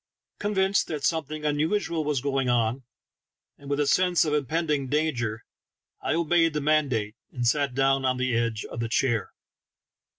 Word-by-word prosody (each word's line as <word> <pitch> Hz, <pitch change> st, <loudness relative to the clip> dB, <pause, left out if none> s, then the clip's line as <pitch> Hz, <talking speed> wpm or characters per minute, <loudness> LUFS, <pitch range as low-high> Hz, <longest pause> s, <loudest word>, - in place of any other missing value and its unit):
Convinced 195 Hz, -1 st, +1 dB
that 150 Hz, -3 st, -4 dB
some 160 Hz, -1 st, +1 dB
thing 150 Hz, +1 st, -7 dB
unusual 160 Hz, +3 st, 0 dB
was 145 Hz, -4 st, -1 dB
going 135 Hz, -2 st, 0 dB
on, 120 Hz, +1 st, +1 dB, 0.8 s
and 140 Hz, -, -11 dB
with 140 Hz, 0 st, 0 dB
a 145 Hz, -, +2 dB
sense 180 Hz, +2 st, +3 dB
of 150 Hz, -, -1 dB
impending 150 Hz, -1 st, 0 dB
danger, 125 Hz, -7 st, -1 dB, 0.6 s
I -, -, 0 dB
obeyed 165 Hz, 0 st, +2 dB
the 150 Hz, -, 0 dB
mandate, 140 Hz, -8 st, +1 dB, 0.2 s
and 120 Hz, -2 st, -3 dB
sat 140 Hz, 0 st, +1 dB
down 135 Hz, 0 st, +2 dB
on 130 Hz, -1 st, +1 dB
the 130 Hz, -2 st, 0 dB
edge 115 Hz, -2 st, -1 dB
of -, -, -7 dB
the 115 Hz, -1 st, -2 dB
chair. 120 Hz, -3 st, 0 dB
145 Hz, 165 wpm, -26 LUFS, 125-155 Hz, 0.8 s, sense